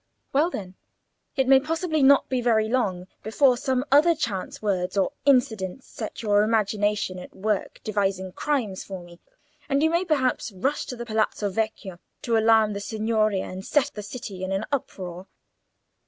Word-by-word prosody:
"Well, 300 +5 +3
then, 190 - -6 0.6
it 265 -2 +1
may 265 0 +7
possibly 315 +2 -1
not 275 +1 +6
be 255 -1 -1
very 220 -3 +2
long 200 -7 0 0.2
before 250 +4 +3
some 260 +1 -1
other 310 +4 +6
chance 210 - -3
words 190 -2 -1
or 195 - +2
incidents 250 -5 +2
set 225 +1 -6
your 205 -1 +4
imagination 210 -3 0
at 180 - -11
work 210 0 -2
devising 195 -3 -1
crimes 220 -5 -2
for 190 -2 -8
me, 175 0 -15 0.5
and 280 +1 +2
you 320 - +3
may 340 +2 +2
perhaps 275 -9 0
rush 270 +11 -1
to 250 - -5
the 240 0 -6
Palazzo 215 -2 0
Vecchio 195 -3 -3 0.2
to 235 - +1
alarm 220 -1 +4
the 200 - -4
Signoria 215 -1 0
and 185 +1 -7
set 295 +4 +1
the 210 - -6
city 205 -3 -7
in 185 - -3
an 195 +3 -1
uproar. 185 -9 -4
220 Hz, 170 wpm, -25 LUFS, 195-265 Hz, 0.6 s, may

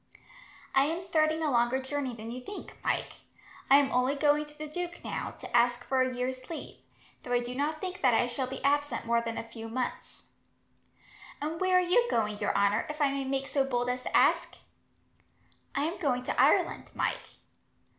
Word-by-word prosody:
"I 270 0 +5
am 325 +3 -1
starting 320 -3 +1
a 300 - +1
longer 240 +1 +2
journey 265 -2 -3
than 225 +1 -7
you 250 +1 -6
think, 405 +11 -9
Mike. - - -1 0.5
I 275 - +9
am 285 -1 +3
only 255 +3 +2
going 295 +1 +3
to 295 0 -15
the 305 - -5
duke, 345 +3 -5
now, - - -3
to - - -6
ask 240 0 +3
for 260 0 +1
a 255 0 +1
year's 255 +1 -4
leave; 330 - -7 0.4
though 245 - -4
I 245 - +4
do 240 +1 -5
not 295 +4 -1
think 370 +2 -5
that 255 - +5
I 245 - +3
shall 255 +2 -3
be 265 0 -7
absent 290 -1 +1
more 235 0 +2
than 230 -1 -4
a - - -3
few 225 -1 -8
months." 250 +2 -4 1.2
"And 315 +4 -4
where 370 -1 +4
are - - +5
you 370 +7 +3
going, 210 - 0
your 205 - 0
honour, 200 +1 +2
if 300 +1 -5
I 285 -2 +3
may 275 -1 -2
make 270 0 -1
so 275 -1 +1
bold 245 -2 -1
as 250 0 -4
to - - +1
ask?" - - +3 1.2
"I 280 - +1
am 335 +3 -3
going 255 -7 0
to - - +1
Ireland, - - +2
Mike." - - 0
270 Hz, 205 wpm, -30 LUFS, 245-300 Hz, 1.2 s, I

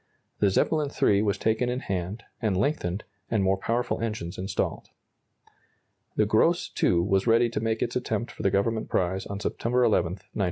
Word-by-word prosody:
The 100 - +4
"Zeppelin 150 - +1
III" 100 -7 +3
was 105 -2 +1
taken 110 +3 +1
in 125 +1 -2
hand, 95 +4 -3 0.2
and 105 -5 +1
lengthened, 100 - -1 0.3
and 110 -4 +1
more 95 0 +2
powerful 120 +5 -1
engines 105 -7 -4
installed. 95 +1 -2 1.3
The - - +3
"Gross - - +2
II" 85 - +4
was 95 +3 +1
ready 115 +1 +4
to 110 - -1
make 110 0 0
its 120 - -3
attempt 125 -1 -2
for - - -9
the 100 - +3
Government 110 +3 0
prize 95 +1 0
on 100 0 -5
September 125 +4 0
11, 105 -7 +2
1908. 95 +2 -10
105 Hz, 175 wpm, -27 LUFS, 95-115 Hz, 1.3 s, The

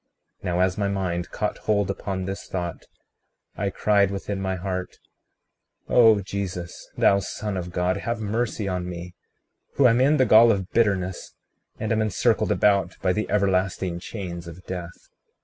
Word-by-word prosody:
36:18 - - -30
Now, 90 -1 0
as 95 0 +1
my 100 - +1
mind 90 -3 -2
caught 105 - -2
hold 100 -2 +1
upon 95 -1 -4
this 95 +1 -5
thought, 85 -2 -5 0.7
I 100 - -1
cried 100 0 +2
within 100 0 -4
my 95 -1 -1
heart: 90 0 -4 0.9
O 115 -4 +6
Jesus, 90 -3 -5
thou 100 - +4
Son 105 +1 -4
of 90 -1 -4
God, 90 +2 0
have 115 +3 -3
mercy 110 0 -2
on 90 -1 -2
me, 90 0 -7 0.6
who 135 - +6
am 120 +1 +3
in 145 +3 +4
the 130 - +4
gall 115 +1 +7
of 95 -2 -2
bitterness, 95 -5 0 0.4
and 110 - -3
am 110 0 +2
encircled 110 -3 +1
about 100 -3 +2
by 90 -1 +3
the 105 +2 -2
everlasting 95 -3 0
chains 90 -3 -6
of 85 +2 -11
death. 90 -2 -7
95 Hz, 165 wpm, -24 LUFS, 90-105 Hz, 0.9 s, gall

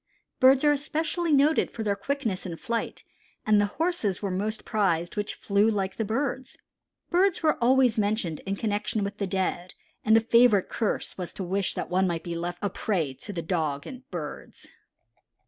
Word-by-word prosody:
Birds 265 +1 +6
are 295 - +5
especially 315 +3 -1
noted 295 +2 +4
for 225 - -5
their 205 -2 +1
quickness 225 -3 -2
in 170 -3 -5
flight, 230 +4 -3 0.4
and 210 -1 +4
the 205 - +2
horses 320 - 0
were 200 -2 -3
most 210 +4 -2
prized 175 -5 0
which 210 -1 -3
flew 205 +2 +2
like 195 -3 -2
the 225 - 0
birds. 260 +3 -3 0.5
Birds 370 0 +2
were 310 - +4
always 250 -2 +4
mentioned 205 -6 0
in 195 - 0
connection 210 0 -1
with 200 +1 -5
the 200 - -1
dead, 185 -1 -2 0.3
and 220 +1 +5
a - - +7
favorite 230 -3 +4
curse 220 -3 -2
was 180 - -4
to 195 - -5
wish 190 +1 -1
that - - -4
one 185 +1 +3
might 165 -2 -2
be 170 - -4
left 175 +1 -3
a 205 - +1
prey 170 -12 -1
to 135 +9 -8
the 170 -4 -4
dogs 155 -5 -1
and 260 0 -10
birds. 160 -5 -7
205 Hz, 185 wpm, -27 LUFS, 185-255 Hz, 0.5 s, a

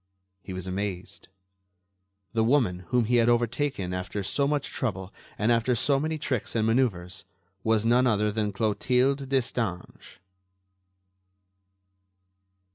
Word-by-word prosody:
He 95 - -9
was 95 -1 -5
amazed. 95 0 -5 1.1
The 110 -1 +2
woman, 110 -8 +1
whom 125 -2 +2
he 120 +2 +2
had 115 0 +4
overtaken 120 -4 0
after 90 +2 -4
so 140 +8 0
much 145 -1 -1
trouble 95 -6 -4 0.2
and 110 +3 +2
after 120 +1 +2
so 140 +3 +2
many 155 +2 -2
tricks 130 -7 -3
and 110 -1 +2
manœuvres, 105 -8 0 0.4
was 110 -1 +2
none 125 +2 +4
other 105 -2 +2
than 105 -1 -1
Clotilde 125 +6 +1
Destange. 115 -8 -3
115 Hz, 120 wpm, -27 LUFS, 100-125 Hz, 1.1 s, had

